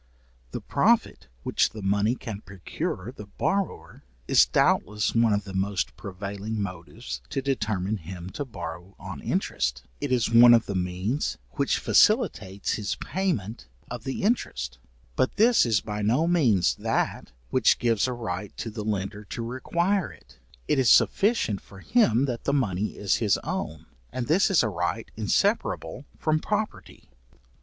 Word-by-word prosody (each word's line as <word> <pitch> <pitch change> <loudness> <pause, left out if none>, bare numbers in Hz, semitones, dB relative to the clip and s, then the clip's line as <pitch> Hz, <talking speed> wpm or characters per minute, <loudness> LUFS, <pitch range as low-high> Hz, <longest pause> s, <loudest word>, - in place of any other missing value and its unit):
The - - -5
profit - - +1 0.2
which - - +1
money 105 +3 +1
can 110 -6 -7
procure 95 +2 -5
the 105 - -9
borrower, 195 - -3 0.2
is - - +6
doubtless 105 +1 +2
one 115 -1 +3
of 100 0 +1
the 95 -1 -9
most 95 0 -1
prevailing 100 +2 -5
motives 85 -9 -6
to - - -2
determine 110 -7 -1
him 90 +1 -8
to 145 - -4
borrow 90 -5 -8
on - - -8
interest; 65 0 -1 0.2
it - - -3
is 125 -3 +2
one 120 +1 +9
of 115 - +2
the 100 - -4
means 95 +9 -2
which 140 -1 0
facilitates 110 - +2
his 100 -4 -2
payment 115 - -3 0.2
of 120 -2 -5
the 135 +9 -4
interest, 70 - -1 0.4
but 130 - +1
this 230 - +5
is 110 -3 +2
by 105 -1 -4
no 120 +10 +2
means 125 - +3
that - - -1 0.2
which - - +4
gives 115 -1 +1
a 125 - -2
right 105 -4 -5
to 115 - -4
the 105 -1 -5
lender 105 0 -3
to 115 +3 -5
require 170 - 0
it; - - -19 0.3
it - - +2
is 125 -3 +4
sufficient 200 - +3
for 95 - -14
him 135 - +3
that 120 -4 -3
his 140 - 0
money 105 -6 -1
is 100 -2 +1
his 105 -5 +2
own, - - -4 0.3
and 125 - -3
this 175 - +3
is 190 -8 +4
a - - +1
right 90 -4 -3
inseparable 80 - 0
from 155 -1 +1
property. 210 +5 -4
110 Hz, 155 wpm, -26 LUFS, 95-130 Hz, 0.4 s, one